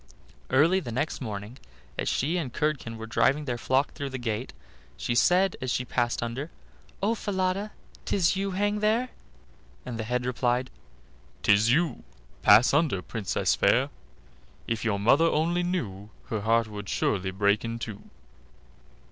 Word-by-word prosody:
Early 165 +8 +4
next 135 +3 -3
morning, 110 +1 -6 0.4
as - - -1
she 155 +7 0
and 150 -8 -3
Curdken 140 -7 -2
were 110 - -6
driving 140 +6 +2
their 120 -3 -3
flock 130 +4 +1
through 140 -1 -4
the 130 - -5
gate, 120 0 -3 0.5
she 120 - -2
said 180 +10 +3
as 130 - -2
she 125 - -1
passed 120 -1 0
under: 125 +7 -4 0.5
"Oh! 215 +3 +3
Falada, 195 -1 -1 0.3
'tis 185 -2 +2
you 195 +1 -1
hang 205 +2 0
there"; 225 +4 +1 0.8
and 115 -2 -5
the - - -1
head 125 +2 -1
replied: 125 0 0 0.7
"'Tis 105 +3 +4
you; 165 +4 +1 0.4
pass 110 +5 +6
under, 145 - +2
Princess 105 -5 -1
fair: - - +3 0.8
If 115 -1 -2
your 110 -3 +1
mother 120 +11 +4
only 165 +2 +1
knew, 110 - -3 0.2
Her 110 -2 -2
heart 115 +2 +3
would 105 -2 -7
surely 95 -2 0
break 100 +2 +1
in 115 0 -3
two." 105 -3 -6
125 Hz, 150 wpm, -27 LUFS, 110-165 Hz, 0.8 s, pass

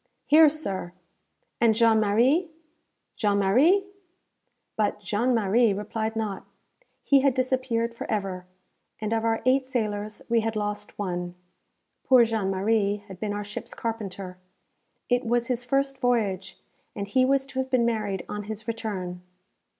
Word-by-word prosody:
"Here, 310 +1 +7
sir!" 195 - -4 0.7
"And 225 -2 +4
Jean 225 -1 +4
Marie? 245 - +3 0.7
Jean 205 -2 +1
Marie?" 275 - +4 0.9
But 210 -1 0
Jean 215 +5 0
Marie 220 +1 +3
replied 220 +2 -3
not. 215 -4 -3 0.6
He 280 - +5
had 270 -1 +2
disappeared 255 -3 0
for 230 - -7
ever, 190 -3 -3 0.5
and 215 +1 -2
of 225 0 0
our 225 0 0
eight 260 +1 +3
sailors 210 -4 -3
we 235 0 +3
had 225 0 -2
lost 210 0 -4
one. 180 -3 -3 0.7
Poor 255 -3 +6
Jean 220 -4 -1
Marie 200 +1 +1
had 190 -2 -10
been 215 -1 -2
our 205 0 -3
ship's 205 +1 -8
carpenter. 195 -5 -5 0.7
It 245 +1 +1
was 240 0 +1
his 245 -1 -1
first 275 +2 0
voyage, 210 -7 0 0.4
and 200 -1 -4
he 255 +5 +3
was 270 +1 +2
to 270 -1 -6
have 260 0 -2
been 255 -2 +2
married 215 -5 -1
on 210 0 -5
his 215 0 -7
return. 200 -6 -4
220 Hz, 150 wpm, -26 LUFS, 205-245 Hz, 0.9 s, Here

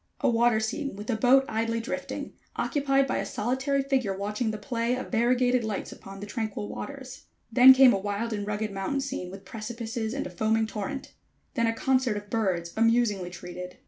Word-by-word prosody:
A - - +3
water 235 -1 +3
scene 220 +3 -3
with 210 +5 -4
a - - +1
boat 260 +4 +5
idly 230 +1 -1
drifting, 230 - -5 0.2
occupied 275 -2 +1
by 265 - -1
a - - -1
solitary 265 +7 -1
figure 260 -8 0
watching 210 +4 -2
the 215 - -3
play 235 +2 -1
of 255 - -6
variegated 245 +1 +2
lights 215 -3 -3
upon 195 0 -10
the - - -4
tranquil 215 -1 -4
waters. 265 0 -8 0.3
Then 255 +2 +9
came 260 -1 +7
a 195 - 0
wild 205 +3 -2
and 205 -1 -3
rugged 210 0 -2
mountain 195 +8 -2
scene 265 -10 -4
with 195 +1 -10
precipices 225 +2 -4
and 280 - -2
a 180 - -6
foaming 220 +4 +1
torrent. 220 +6 -5 0.4
Then 230 -4 +1
a 225 - +1
concert 255 -3 +1
of 205 0 -9
birds 180 -6 -1
amusingly 225 -5 +2
treated. 180 0 -8
225 Hz, 190 wpm, -27 LUFS, 205-255 Hz, 0.4 s, Then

